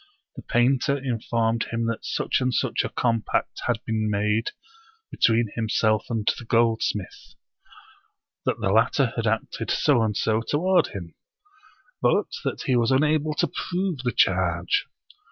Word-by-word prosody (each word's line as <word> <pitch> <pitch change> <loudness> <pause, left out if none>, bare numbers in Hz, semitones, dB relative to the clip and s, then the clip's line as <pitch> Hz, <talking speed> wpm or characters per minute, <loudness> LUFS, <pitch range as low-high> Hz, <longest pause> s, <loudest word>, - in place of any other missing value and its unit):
The - - -8
painter 130 +3 +2
informed 115 -3 -1
him 115 0 -2
that 115 -1 -3
such - - -1
and 130 0 +1
such - - 0
a - - -3
compact 115 -3 -1
had 115 -3 -1
been 110 -1 -1
made 105 +2 0 0.6
between 115 -2 +2
himself 110 -1 +1
and 110 -3 -2
the - - -9
gold 115 0 +2
smith; 100 -3 -4 1.1
that - - -1
the 95 - 0
latter 115 +3 +2
had 115 -1 -1
acted 110 0 -2
so 135 -5 +3
and 110 -2 0
so 110 0 +1
toward 180 +9 +2
him, 85 -5 -8 0.9
but - - +2
that - - -3
he 130 - +1
was 120 -1 +2
unable 150 +3 +2
to - - +1
prove 180 -4 -3
the 125 -1 -1
charge. 90 -4 +1
115 Hz, 150 wpm, -24 LUFS, 110-130 Hz, 1.1 s, so